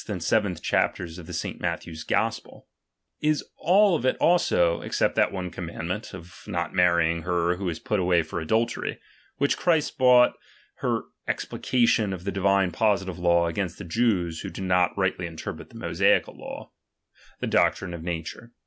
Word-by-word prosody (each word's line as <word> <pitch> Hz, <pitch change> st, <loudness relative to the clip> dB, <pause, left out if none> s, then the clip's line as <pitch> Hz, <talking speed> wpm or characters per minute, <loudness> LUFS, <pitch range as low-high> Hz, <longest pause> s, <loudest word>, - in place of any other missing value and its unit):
and -, -, -3 dB
vii. -, -, +2 dB
chapters 85 Hz, -1 st, -1 dB
of 85 Hz, -, -8 dB
St. -, -, -4 dB
Matthew's 80 Hz, -2 st, -4 dB
Gospel), 115 Hz, +6 st, -2 dB, 0.5 s
is 150 Hz, 0 st, +1 dB
all 190 Hz, +3 st, +4 dB
of 140 Hz, -, -2 dB
it 130 Hz, -, +1 dB
also 90 Hz, -, +3 dB
(except -, -, 0 dB
that -, -, +2 dB
one 90 Hz, -2 st, -4 dB
commandment, 85 Hz, +3 st, -5 dB
of 90 Hz, -1 st, -11 dB
not 85 Hz, -4 st, -3 dB
marrying 85 Hz, -2 st, +3 dB
her 90 Hz, +1 st, 0 dB
who 95 Hz, -1 st, -2 dB
is 80 Hz, -, -4 dB
put 105 Hz, +4 st, -1 dB
away 90 Hz, -2 st, +3 dB
for 80 Hz, -, -5 dB
adultery; 110 Hz, +9 st, -1 dB, 0.4 s
which 140 Hz, +1 st, +1 dB
Christ 160 Hz, -5 st, +1 dB
brought 125 Hz, -1 st, +6 dB, 0.5 s
for -, -, -1 dB, 0.2 s
ex:pli -, -, -4 dB
cation 115 Hz, -5 st, +2 dB
of 90 Hz, -2 st, -7 dB
the 100 Hz, -, -2 dB
divine 95 Hz, -1 st, +2 dB
positive 95 Hz, -3 st, 0 dB
law, 85 Hz, -1 st, +3 dB
against 85 Hz, +1 st, -3 dB
the -, -, -8 dB
Jews, 90 Hz, -4 st, 0 dB
who -, -, -5 dB
did 95 Hz, -, -7 dB
not 90 Hz, 0 st, +2 dB
rightly 95 Hz, -2 st, 0 dB
interpret 80 Hz, -1 st, -7 dB
the -, -, -18 dB
Mosaical -, -, +1 dB
law) -, -, -9 dB, 0.7 s
the -, -, -2 dB
doctrine 95 Hz, -2 st, +1 dB
of 85 Hz, -, -6 dB
nature. 85 Hz, +7 st, -6 dB
90 Hz, 165 wpm, -26 LUFS, 85-110 Hz, 0.7 s, brought